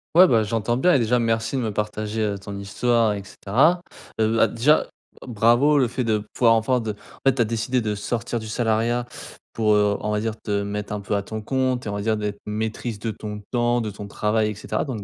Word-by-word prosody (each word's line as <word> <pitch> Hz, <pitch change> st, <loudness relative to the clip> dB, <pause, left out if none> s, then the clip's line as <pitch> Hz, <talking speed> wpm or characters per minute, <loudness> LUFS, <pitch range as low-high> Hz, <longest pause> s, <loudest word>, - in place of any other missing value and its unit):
Ouais, 185 Hz, -, +9 dB
bah, 115 Hz, -6 st, +4 dB
j'entends 115 Hz, +2 st, -1 dB
bien 180 Hz, +6 st, +4 dB
et 135 Hz, -, +4 dB
déjà 120 Hz, +1 st, +2 dB
merci 115 Hz, +3 st, 0 dB
de -, -, 0 dB
me 110 Hz, -3 st, -1 dB
partager, 105 Hz, +1 st, -3 dB
heu, 100 Hz, -2 st, -1 dB
ton 100 Hz, 0 st, -7 dB
histoire 110 Hz, +2 st, +1 dB
et 100 Hz, -1 st, -5 dB
cetera. 135 Hz, -, +2 dB, 0.4 s
Heu, 110 Hz, +1 st, +2 dB
bah, 115 Hz, -, +5 dB
déjà, 125 Hz, +8 st, +3 dB, 0.4 s
e -, -, -11 dB
bravo 120 Hz, +6 st, +4 dB
le 130 Hz, -3 st, +3 dB
fait 125 Hz, +2 st, -2 dB
de 110 Hz, -2 st, 0 dB
pouvoir 115 Hz, -2 st, +4 dB
enfin 125 Hz, +3 st, +1 dB
de 110 Hz, -2 st, -3 dB
en 105 Hz, -, -19 dB
fait, 135 Hz, -, +5 dB
tu 120 Hz, -, +1 dB
as -, -, +4 dB
décidé 115 Hz, +3 st, -1 dB
de 105 Hz, -1 st, -1 dB
sortir 115 Hz, +3 st, -3 dB
du 110 Hz, -, -8 dB
salariat 115 Hz, +1 st, 0 dB, 0.5 s
pour, 110 Hz, -2 st, +2 dB
heu, 105 Hz, -1 st, +2 dB
on 105 Hz, -, -3 dB
va 105 Hz, -, +1 dB
dire, 110 Hz, 0 st, -2 dB
te 100 Hz, -1 st, -1 dB
mettre 105 Hz, +1 st, -4 dB
un 105 Hz, -, -3 dB
peu 105 Hz, +1 st, -2 dB
à 100 Hz, -, 0 dB
ton 110 Hz, +1 st, -6 dB
compte 130 Hz, +1 st, -1 dB
et -, -, -3 dB
on 100 Hz, -, -3 dB
va 100 Hz, -, -3 dB
dire 110 Hz, +1 st, +1 dB
d'être 105 Hz, -1 st, -4 dB
maîtrise 110 Hz, +1 st, -3 dB
de 115 Hz, +2 st, -3 dB
ton 105 Hz, -1 st, -7 dB
temps, 120 Hz, -1 st, +1 dB
de 110 Hz, -, -3 dB
ton 100 Hz, 0 st, -8 dB
travail 105 Hz, +1 st, 0 dB
et -, -, -7 dB
cetera, 105 Hz, -, -3 dB
donc 115 Hz, -7 st, -5 dB
110 Hz, 250 wpm, -23 LUFS, 105-120 Hz, 0.5 s, Ouais